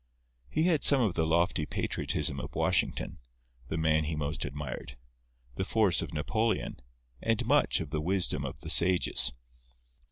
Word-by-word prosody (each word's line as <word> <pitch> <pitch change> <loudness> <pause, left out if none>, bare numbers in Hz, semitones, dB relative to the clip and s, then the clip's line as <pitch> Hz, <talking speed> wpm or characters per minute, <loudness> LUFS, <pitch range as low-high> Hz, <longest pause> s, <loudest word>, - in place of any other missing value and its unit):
He 155 - 0
had 165 -4 +1
some 140 - +10
of 105 -7 0
the 80 -1 -1
lofty 85 -1 0
patriotism 70 - -2
of - - -8
Washington - - -1 0.5
(the 80 - -4
man 80 -1 +1
he 80 +1 -3
most 75 +2 -3
admired), 70 -2 -7 0.6
the - - -1
force 100 -4 +2
of - - -6
Napoleon, 110 +9 -2 0.4
and 115 +1 -1
much 145 +5 +2
of 80 -4 -7
the 75 - -2
wisdom 95 +3 0
of - - -7
the - - -1
sages. 85 -8 +3
85 Hz, 155 wpm, -29 LUFS, 75-110 Hz, 0.6 s, some